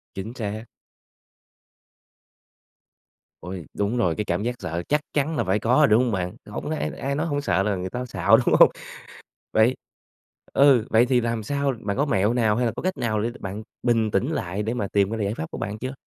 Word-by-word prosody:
Chính 100 Hz, +4 st, -5 dB
xác. 110 Hz, 0 st, -4 dB, 2.8 s
Ôi, 90 Hz, -2 st, -7 dB
đúng 105 Hz, +4 st, -1 dB
rồi, 90 Hz, -9 st, +1 dB
cái 105 Hz, -, -2 dB
cảm 90 Hz, +2 st, -1 dB
giác 120 Hz, +1 st, -1 dB
sợ 85 Hz, +2 st, -4 dB
chắc 150 Hz, +1 st, +2 dB
chắn 150 Hz, +2 st, 0 dB
là 120 Hz, -, +1 dB
phải 95 Hz, +1 st, +1 dB
có 115 Hz, -, -1 dB
rồi -, -, +5 dB
rồi, 150 Hz, -, +6 dB
đúng 115 Hz, +2 st, +4 dB
hông 120 Hz, -, 0 dB
bạn? 90 Hz, -3 st, -2 dB
Hổng -, -, -6 dB
ai 75 Hz, +1 st, -2 dB
ai 140 Hz, +2 st, -2 dB
nói 150 Hz, +3 st, -1 dB
hổng 145 Hz, -2 st, -1 dB
sợ 95 Hz, -9 st, +1 dB
là 105 Hz, 0 st, 0 dB
người 95 Hz, 0 st, -4 dB
ta 125 Hz, +5 st, -4 dB
xạo 125 Hz, -, +4 dB
đúng -, -, +2 dB
hông? -, -, +9 dB, 0.8 s
Vậy 110 Hz, +4 st, +4 dB, 0.8 s
ừ, 135 Hz, -5 st, +5 dB
vậy 115 Hz, +2 st, +5 dB
thì 125 Hz, -1 st, +3 dB
làm 115 Hz, -2 st, -2 dB
sao 140 Hz, +4 st, -1 dB
bạn 100 Hz, -3 st, -3 dB
có 145 Hz, -, +1 dB
mẹo 105 Hz, -5 st, +2 dB
nào 110 Hz, -4 st, +2 dB
hay 125 Hz, +1 st, +1 dB
là 115 Hz, -, 0 dB
có -, -, -5 dB
cách 185 Hz, +1 st, -1 dB
nào 110 Hz, -3 st, 0 dB
để 115 Hz, -, -1 dB
bạn 100 Hz, +2 st, -5 dB, 0.2 s
bình 115 Hz, -3 st, +2 dB
tĩnh 120 Hz, +11 st, 0 dB
lại 100 Hz, -, -2 dB
để 110 Hz, +3 st, -2 dB
mà 105 Hz, -5 st, -2 dB
tìm 100 Hz, 0 st, +2 dB
ra 110 Hz, -2 st, -2 dB
giải 100 Hz, +2 st, -1 dB
pháp 80 Hz, -, -6 dB
của -, -, -7 dB
bạn 105 Hz, +2 st, -4 dB
chưa? 130 Hz, +3 st, -5 dB
110 Hz, 225 wpm, -24 LUFS, 100-125 Hz, 2.8 s, hông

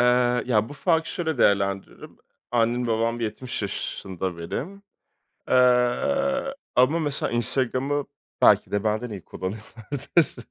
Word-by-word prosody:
Eee, 125 Hz, 0 st, +3 dB
ya 110 Hz, -3 st, +2 dB
bu -, -, -9 dB
farkı 165 Hz, +2 st, +1 dB
şöyle 160 Hz, -6 st, -2 dB
değerlendiririm. 100 Hz, -2 st, 0 dB, 0.3 s
Annem, 120 Hz, +1 st, +1 dB
babam 115 Hz, +1 st, 0 dB
70 120 Hz, +1 st, -4 dB
yaşında 95 Hz, -2 st, -4 dB
benim, 180 Hz, -, -5 dB, 0.7 s
eee, 275 Hz, -, +2 dB, 0.2 s
ama 130 Hz, +7 st, +4 dB
,mesela, 145 Hz, -5 st, -2 dB
Instagram'ı 130 Hz, +4 st, 0 dB, 0.4 s
belki -, -, +5 dB
de 100 Hz, +1 st, -1 dB
benden 110 Hz, +3 st, -1 dB
iyi 100 Hz, -5 st, -7 dB
kullanıyorlardır. 110 Hz, -, -2 dB
125 Hz, 115 wpm, -25 LUFS, 110-145 Hz, 0.7 s, belki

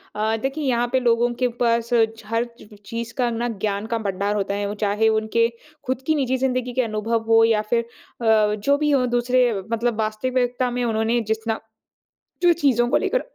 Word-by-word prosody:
अ, 220 Hz, +1 st, 0 dB
देखिए 275 Hz, +4 st, -2 dB
यहाँ 240 Hz, -1 st, +1 dB
पर 260 Hz, -, +3 dB
लोगों 240 Hz, 0 st, +2 dB
के -, -, +5 dB
पास 235 Hz, -1 st, +2 dB, 0.3 s
छ 225 Hz, -, -14 dB
हर 230 Hz, +2 st, 0 dB, 0.4 s
चीज़ 230 Hz, +1 st, -5 dB
का 245 Hz, -2 st, +1 dB
ना 235 Hz, +1 st, -2 dB, 0.2 s
ज्ञान 200 Hz, 0 st, -2 dB
का -, -, +2 dB
भंडार 200 Hz, +2 st, -1 dB
होता 200 Hz, -1 st, -1 dB
है। 205 Hz, 0 st, -2 dB
वो 205 Hz, -, -3 dB
चाहे 210 Hz, +2 st, +2 dB
उनके 230 Hz, +1 st, +1 dB, 0.4 s
ख़ुद 260 Hz, 0 st, -1 dB
की 315 Hz, -, +3 dB
निजी 260 Hz, -2 st, 0 dB
ज़िंदगी 255 Hz, -1 st, -1 dB
के 255 Hz, -, +2 dB
अनुभव 225 Hz, 0 st, -1 dB
हो 225 Hz, 0 st, +7 dB
या 225 Hz, -2 st, +2 dB
फ़िर 235 Hz, -1 st, +3 dB, 0.4 s
अ, 215 Hz, -2 st, +3 dB
जो 280 Hz, +8 st, +1 dB
भी 300 Hz, 0 st, +1 dB
हो 270 Hz, -3 st, +3 dB
दूसरे 245 Hz, 0 st, +2 dB, 0.2 s
मतलब 230 Hz, 0 st, 0 dB
वास्तविकता 245 Hz, +3 st, 0 dB
में 245 Hz, 0 st, -2 dB
उन्होंने 225 Hz, +1 st, +1 dB
जितना 220 Hz, 0 st, -3 dB, 0.8 s
जो 350 Hz, -1 st, +5 dB
चीज़ों 265 Hz, -7 st, +2 dB
को 280 Hz, -, +3 dB
लेकर -, -, 0 dB
235 Hz, 195 wpm, -22 LUFS, 220-250 Hz, 0.8 s, हो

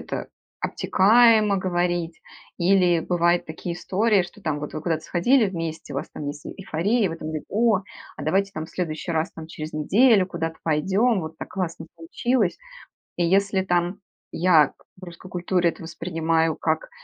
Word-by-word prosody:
это -, -, -5 dB, 0.3 s
обтекаемо 215 Hz, 0 st, +4 dB
говорить. 175 Hz, -2 st, -1 dB, 0.4 s
Или 180 Hz, -1 st, +4 dB
бывают 175 Hz, +1 st, +1 dB
такие 170 Hz, +2 st, -5 dB
истории, 200 Hz, +2 st, +2 dB
что 175 Hz, -, -11 dB
там 150 Hz, -2 st, -1 dB
вот 150 Hz, -, -7 dB
вы 155 Hz, -, -4 dB
куда-то 160 Hz, -2 st, -1 dB
сходили 225 Hz, +6 st, +3 dB
вместе, 165 Hz, -4 st, -5 dB
у -, -, -3 dB
вас -, -, -4 dB
там 145 Hz, -, -7 dB
есть 145 Hz, +1 st, -6 dB
эйфория, 200 Hz, +5 st, -1 dB
и -, -, +2 dB
вы 165 Hz, -, -5 dB
там 155 Hz, -, -7 dB
говорите: 155 Hz, -1 st, -5 dB
"О, 225 Hz, 0 st, +3 dB, 0.4 s
а -, -, -7 dB
давайте 195 Hz, +1 st, +1 dB
в -, -, -36 dB
там 155 Hz, 0 st, -4 dB
следующий 165 Hz, -1 st, -4 dB
раз 160 Hz, 0 st, -1 dB
там 160 Hz, -1 st, -9 dB
через 155 Hz, -1 st, -7 dB
неделю 200 Hz, -, +4 dB
куда-то 165 Hz, -3 st, -4 dB
пойдем, 190 Hz, +8 st, +2 dB
вот 160 Hz, 0 st, -8 dB
так -, -, -7 dB
классно 165 Hz, -3 st, -4 dB
получилось". 205 Hz, +5 st, -1 dB, 0.6 s
И 175 Hz, -, 0 dB
если 195 Hz, +2 st, +2 dB
там 175 Hz, +1 st, 0 dB, 0.3 s
я 160 Hz, -4 st, +4 dB, 0.2 s
в 185 Hz, -, -16 dB
русской 175 Hz, +1 st, -11 dB
культуре 175 Hz, -1 st, +1 dB
это -, -, -9 dB
воспринимаю 165 Hz, -1 st, -1 dB
как -, -, -1 dB
175 Hz, 175 wpm, -24 LUFS, 160-195 Hz, 0.6 s, обтекаемо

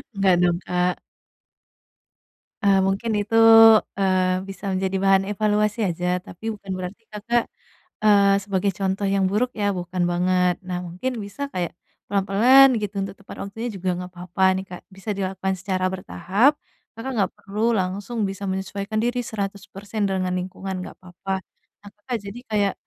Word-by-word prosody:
Enggak 195 Hz, -2 st, +4 dB
dong 175 Hz, -1 st, +2 dB
Kak. 180 Hz, 0 st, 0 dB, 1.7 s
Eee, 200 Hz, -1 st, +5 dB
mungkin 210 Hz, +4 st, -1 dB
itu, 225 Hz, +2 st, -3 dB, 0.6 s
eee, 185 Hz, -1 st, +2 dB
bisa 195 Hz, -, -8 dB
menjadi 190 Hz, 0 st, -1 dB
bahan 195 Hz, 0 st, +4 dB
evaluasi 210 Hz, +1 st, +1 dB
aja, 180 Hz, +1 st, -1 dB
tapi 220 Hz, +6 st, -6 dB
bukan 200 Hz, -2 st, -9 dB
berarti 185 Hz, +5 st, -7 dB
Kakak, 230 Hz, +3 st, 0 dB, 0.6 s
eee, 200 Hz, -2 st, +5 dB
sebagai 195 Hz, 0 st, 0 dB
contoh 195 Hz, +1 st, -1 dB
yang 195 Hz, 0 st, +2 dB
buruk 235 Hz, +6 st, 0 dB
ya 205 Hz, -, +2 dB
bukan 180 Hz, 0 st, -2 dB
banget. 180 Hz, 0 st, +2 dB
Nah 180 Hz, -1 st, -2 dB
mungkin 185 Hz, +10 st, -3 dB
bisa 200 Hz, +8 st, -10 dB
kayak 175 Hz, -3 st, -2 dB, 0.4 s
pelan-pelan 215 Hz, +8 st, +6 dB
gitu 205 Hz, -1 st, -4 dB
untuk 195 Hz, 0 st, -5 dB
tepat 200 Hz, -, -11 dB
waktunya 225 Hz, +4 st, -5 dB
juga 185 Hz, -1 st, -2 dB
nggak 180 Hz, 0 st, -7 dB
papa 180 Hz, +2 st, -3 dB
nih 190 Hz, -, -5 dB
Kak 180 Hz, -, -8 dB
bisa 195 Hz, +2 st, -8 dB
dilakukan 190 Hz, 0 st, -2 dB
secara 185 Hz, -1 st, -1 dB
bertahap. 190 Hz, -, +2 dB, 0.5 s
Kakak 265 Hz, +4 st, -4 dB
nggak 195 Hz, -4 st, +1 dB
perlu 215 Hz, +3 st, 0 dB
langsung 200 Hz, +4 st, -2 dB
bisa 195 Hz, +1 st, -7 dB
menyesuaikan 200 Hz, +3 st, -3 dB
diri 245 Hz, +1 st, 0 dB
100% 200 Hz, -1 st, -4 dB
dengan 185 Hz, -1 st, -1 dB
lingkungan 185 Hz, +1 st, -5 dB
enggak -, -, -9 dB
papa. 190 Hz, +1 st, -5 dB, 0.4 s
Nah -, -, -9 dB
Kakak 235 Hz, +4 st, -4 dB
jadi 200 Hz, +4 st, -7 dB
kayak 205 Hz, -2 st, +1 dB
195 Hz, 150 wpm, -23 LUFS, 185-210 Hz, 1.7 s, pelan-pelan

